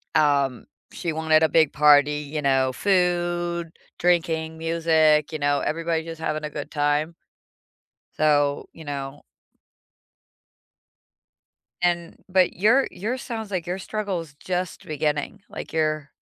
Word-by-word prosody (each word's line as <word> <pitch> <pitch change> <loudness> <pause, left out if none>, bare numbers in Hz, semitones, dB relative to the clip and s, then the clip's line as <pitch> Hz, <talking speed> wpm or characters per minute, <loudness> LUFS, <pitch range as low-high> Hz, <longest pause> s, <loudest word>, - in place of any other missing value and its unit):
Um, 140 -4 +2 0.3
she 170 - -3
wanted 160 0 +3
a 160 - +4
big 160 -3 +3
party, 150 0 +5 0.2
you 150 - -1
know, 135 -1 +2
food, 175 -1 0 0.3
drinking, 160 -2 +1
music, 160 -2 +2
you 155 - -3
know, 145 0 +2
everybody 165 0 -1
just 165 -1 -8
having 155 -1 -2
a - - -4
good 145 -1 -7
time. 145 +2 0 1.0
So, 145 -2 +2
you 160 - -12
know 140 0 -6 2.6
And 175 -1 -1
but 185 -1 +3
your 225 +9 +3
your 225 +7 -3
sounds 225 -4 -6
like 180 -3 -3
your 180 +2 -3
struggle 200 -2 -3
is 150 -3 -13
just 180 +2 -4
beginning, 150 +5 -2
like - - -8
you're 155 -2 0
160 Hz, 130 wpm, -24 LUFS, 150-175 Hz, 2.6 s, party